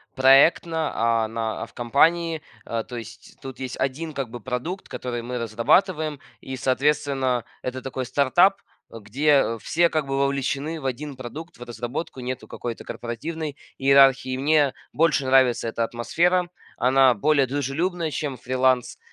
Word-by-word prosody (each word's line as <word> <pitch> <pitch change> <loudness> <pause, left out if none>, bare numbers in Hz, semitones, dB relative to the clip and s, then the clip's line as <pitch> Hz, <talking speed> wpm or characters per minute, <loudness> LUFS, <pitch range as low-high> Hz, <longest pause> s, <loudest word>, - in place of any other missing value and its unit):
проектно, 155 +4 +4
а 115 -1 +1
на 110 0 -3
а - - -4
в - - -20
компании, 160 +6 +2 0.2
э. 115 -1 -3
То 125 - -8
есть 110 -3 -11
тут 135 -1 -9
есть 130 -1 -5
1 150 +5 -2
как 135 -4 -4
бы 120 +1 -8
продукт, 130 - -4
который 120 -2 -4
мы 125 +1 -5
разрабатываем, 150 - +1 0.2
и, 130 - -6
соответственно, 135 -2 0 0.2
это 130 0 -4
такой 130 -1 -4
стартап, 175 +10 +3 0.3
где 115 +3 +1
все 170 +1 +2
как 155 -3 -1
бы 135 0 -2
вовлечены 140 +3 -1
в - - -9
1 135 +2 -4
продукт, 150 +7 -9
в 120 - -9
разработку. 120 +5 -5
Нету 125 0 -5
какой-то 120 -2 -6
корпоративной 150 +6 -5 0.2
иерархии, 135 -1 +4
мне 145 0 +3 0.2
больше 155 -4 +2
нравится 130 -3 +3
эта 115 +1 -1
атмосфера, 175 +11 +1 0.3
она 130 +1 +4
более 140 +5 +2
дружелюбная, 155 +5 -2
чем 140 -2 -3
фриланс, 130 0 0
135 Hz, 145 wpm, -24 LUFS, 120-155 Hz, 0.3 s, проектно